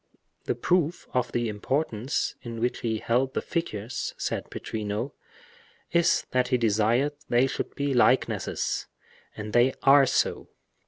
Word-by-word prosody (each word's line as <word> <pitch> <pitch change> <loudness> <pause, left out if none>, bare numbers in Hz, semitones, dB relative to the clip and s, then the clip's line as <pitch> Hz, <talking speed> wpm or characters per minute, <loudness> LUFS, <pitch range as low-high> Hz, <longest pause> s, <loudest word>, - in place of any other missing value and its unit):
"The - - 0
proof 175 -2 0
of 125 -1 0
the 120 -1 0
importance 115 +3 -1
in 115 -2 -6
which 120 +2 0
he 110 -2 -1
held 125 +4 0
the - - +1
figures," 120 - -3
said - - -3
Pittrino, 105 +4 -4 0.8
"is 170 -1 +3
that 125 -1 +2
he 125 0 +2
desired 115 +5 +2 0.2
they 120 +2 +4
should 135 - -4
be 140 -1 -1
likenesses, 125 +1 +1 0.5
and 105 +1 -6
they 125 +2 +4
are 135 0 +7
so." - - 0
125 Hz, 140 wpm, -27 LUFS, 115-135 Hz, 0.8 s, are